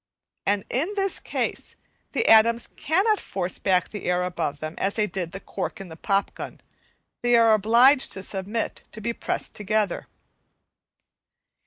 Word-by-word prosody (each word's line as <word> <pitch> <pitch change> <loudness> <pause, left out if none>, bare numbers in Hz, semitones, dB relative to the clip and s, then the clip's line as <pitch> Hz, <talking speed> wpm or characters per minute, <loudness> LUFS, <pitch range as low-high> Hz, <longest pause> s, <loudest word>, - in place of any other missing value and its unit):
And 200 0 +1
in 310 +10 +1
this 390 -1 +1
case - - -3 0.4
the 455 - +1
atoms 230 +1 +6
cannot 390 +7 +1
force 185 -2 -3
back 185 -2 +1
the 210 - -7
air 180 0 +1
above 170 -5 -3
them 155 +1 -5
as 195 +1 0
they 215 - +2
did 185 -5 -4
the 195 - -7
cork - - -5
in 195 -2 -8
the 160 - -9
pop 195 +4 0
gun; - - -8 0.6
they 240 0 +3
are 230 -1 +6
obliged 235 +6 +5
to 190 - -5
submit 200 +4 -3
to 220 - -9
be 235 +2 -2
pressed - - -4
together. 210 -2 -1
210 Hz, 160 wpm, -25 LUFS, 185-235 Hz, 0.6 s, atoms